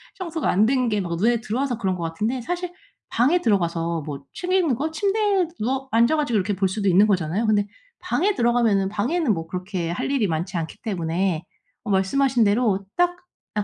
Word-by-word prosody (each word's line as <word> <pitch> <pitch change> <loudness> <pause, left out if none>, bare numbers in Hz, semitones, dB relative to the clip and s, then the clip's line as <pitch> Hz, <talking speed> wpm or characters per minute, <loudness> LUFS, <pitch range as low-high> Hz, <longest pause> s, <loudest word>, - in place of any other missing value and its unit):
청소가 335 -4 -3
안 205 +4 +4
된 255 0 +2
게 210 -2 0
막 170 -2 -3
눈에 230 +6 +2
들어와서 245 +3 -2
그런 190 -5 -1
것 175 - -7
같은데 210 +10 -2
사실 355 +6 -4 0.4
방에 295 +9 +2
들어가서 170 - 0
뭐 140 -1 -6
책 360 0 -4
읽는 360 -8 +3
거 300 +7 -2
침대에 395 +2 +1
누워 265 +4 -1
앉아 235 +6 +4
가지고 290 -6 -1
이렇게 200 +1 0
볼 190 +1 +1
수도 200 +1 0
있는 190 +3 +6
거잖아요. 190 +1 0
근데 205 -2 +2 0.4
방에 410 +2 +1
들어가면은 235 - +2
방에는 245 - 0
뭐 165 0 -5
그렇게 180 -1 -3
할 175 - -2
일이 265 -6 +2
많지 170 +2 -2
않기 165 -1 -4
때문에 175 -4 -1 0.4
어 215 - -6
말씀하신 240 +6 +2
대로 205 -2 +2
딱 355 0 +2 0.4
'아 210 - 0
215 Hz, 390 characters per minute, -23 LUFS, 185-270 Hz, 0.4 s, 있는